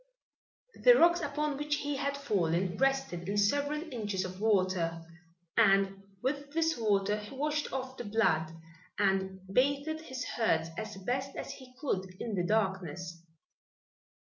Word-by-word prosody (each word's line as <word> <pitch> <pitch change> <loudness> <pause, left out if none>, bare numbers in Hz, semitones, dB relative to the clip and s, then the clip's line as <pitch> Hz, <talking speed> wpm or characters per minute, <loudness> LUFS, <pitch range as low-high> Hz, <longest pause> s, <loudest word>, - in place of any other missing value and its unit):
The - - +9
rocks 345 +1 +5
upon 295 0 -1
which 295 +1 0
he 290 -1 -2
had 280 0 -1
fallen 185 -8 0
rested 270 -10 0
in 205 - -1
several 285 +9 +1
inches 205 -5 -2
of 185 +1 -7
water, 185 -6 +1 0.5
and 195 0 +4 0.2
with 285 +2 -2
this 325 0 +2
water 210 -3 +1
he 210 +6 -8
washed 300 +2 -1
off 260 0 -4
the - - -5
blood 170 -7 +2 0.5
and 190 -1 +1
bathed 280 +8 +1
his 260 -5 -5
hurts 165 -8 +1
as 215 +1 -5
best 260 +7 -2 0.2
he 255 -1 -12
could 190 -10 -2
in 230 - -4
the 180 -3 0
darkness. 180 -4 -1
220 Hz, 140 wpm, -31 LUFS, 190-280 Hz, 0.5 s, The